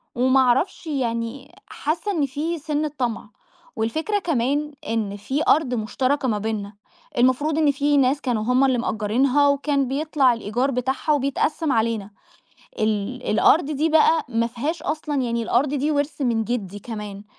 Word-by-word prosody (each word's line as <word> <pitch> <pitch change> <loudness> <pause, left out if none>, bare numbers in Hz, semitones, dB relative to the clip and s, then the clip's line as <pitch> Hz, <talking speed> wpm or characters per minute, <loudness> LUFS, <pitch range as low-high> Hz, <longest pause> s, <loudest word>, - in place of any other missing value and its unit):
وما 260 +2 +3
اعرفش 265 +7 +1
يعني 240 -2 -3
حاسة 330 +7 -2
إن 315 -7 +1
في 300 +6 -3
سنة 300 0 -2
طمع، 240 -3 -2 0.5
والفكرة 315 - -1
كمان 295 -2 -1
إن 215 -3 -2
في 265 +9 -2
أرض 290 -5 +3
مشتركة 255 +5 0
ما 215 -4 +1
بينّا، 210 -1 -4 0.4
المفروض 260 +5 +2
إن 305 -2 +4
في 290 +1 +1
ناس 275 +1 +2
كانوا 235 -5 -1
هُم 250 +3 +3
اللي 260 -2 +2
مأجّرينها، 245 +6 +2
وكان 280 -1 +1
بيطلع 280 -2 +2
الإيجار 235 +4 -1
بتاعها 260 +4 -1
وبيتقسم 290 +2 0
علينا. 220 -3 0 0.7
ال 215 +3 -1
الأرض 295 +9 +4
دي 305 +2 0
بقى، 320 +1 +4
ما 230 -1 0
فيهاش 265 +8 -4
أصلًا 300 0 -3
يعني 235 -1 -1
الأرض 260 +5 +1
دي 290 +2 0
وِرث 290 +1 -1
من 235 -4 +1
جدي 205 -4 -3
كمان، 210 -2 -7
260 Hz, 150 wpm, -23 LUFS, 230-295 Hz, 0.7 s, إن